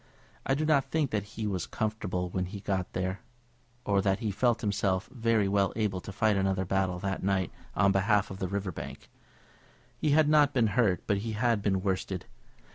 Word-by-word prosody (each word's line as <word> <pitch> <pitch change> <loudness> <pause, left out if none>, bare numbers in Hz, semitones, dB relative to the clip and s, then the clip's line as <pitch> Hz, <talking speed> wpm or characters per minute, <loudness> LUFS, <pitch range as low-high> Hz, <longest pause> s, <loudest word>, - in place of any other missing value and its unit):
I 135 - +3
do 155 +2 -1
not 150 -3 +3
think 150 -5 0
that 105 - 0 0.2
he 110 - -2
was 95 -4 -2
comfortable 105 -5 -2
when 90 0 -1
he 100 +2 -7
got 95 -2 -2
there, 95 +1 -2 0.6
or 100 -1 +2
that 95 -1 +2
he 110 -2 -2
felt 120 +3 +1
himself 100 -2 0
very 115 -4 +2
well 100 0 +2
able 105 -4 -1
to - - -8
fight 110 +1 +2
another 95 -1 +1
battle 95 0 0
that 95 -1 -2
night 95 -2 0 0.2
on 100 -1 +4
behalf 100 +1 +2
of 95 - -7
the 95 - -1
River 100 0 -2
Bank. - - -9 0.9
He 150 - +1
had 150 +1 +5
not 150 -2 +4
been 120 -3 +4
hurt, 105 -6 +2
but 100 - +1
he 110 +2 -4
had 115 -1 +1
been 95 -2 0
worsted. 95 -1 -2
100 Hz, 200 wpm, -29 LUFS, 95-115 Hz, 0.9 s, had